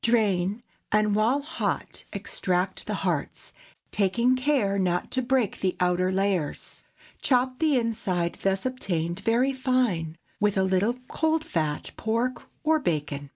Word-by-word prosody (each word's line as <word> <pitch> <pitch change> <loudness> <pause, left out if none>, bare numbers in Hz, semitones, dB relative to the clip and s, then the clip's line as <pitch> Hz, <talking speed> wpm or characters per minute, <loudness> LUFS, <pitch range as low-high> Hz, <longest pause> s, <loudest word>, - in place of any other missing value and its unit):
Drain, 210 -2 +2 0.3
and 210 0 +3
while 230 +7 +2
hot 310 - -3
extract 180 +1 -2
the - - -1
hearts, - - -2 0.4
taking 235 +6 +2
care 255 -7 +1
not 180 -1 0
to 260 - +1
break 250 -4 +1
the 185 -1 0
outer 180 +1 +2
layers. 190 -5 -1 0.4
Chop 255 -1 +2
the 310 -4 +3
inside 200 -7 -1
thus 195 +2 0
obtained 175 -9 -2
very 235 +6 +2
fine, 245 -12 0 0.2
with 205 -1 +2
a 190 - +4
little 190 +5 +2
cold 320 0 +1
fat 155 - -2
pork 235 +3 -1 0.2
or 315 +1 +3
bacon. 145 - -2
210 Hz, 135 wpm, -26 LUFS, 180-255 Hz, 0.4 s, a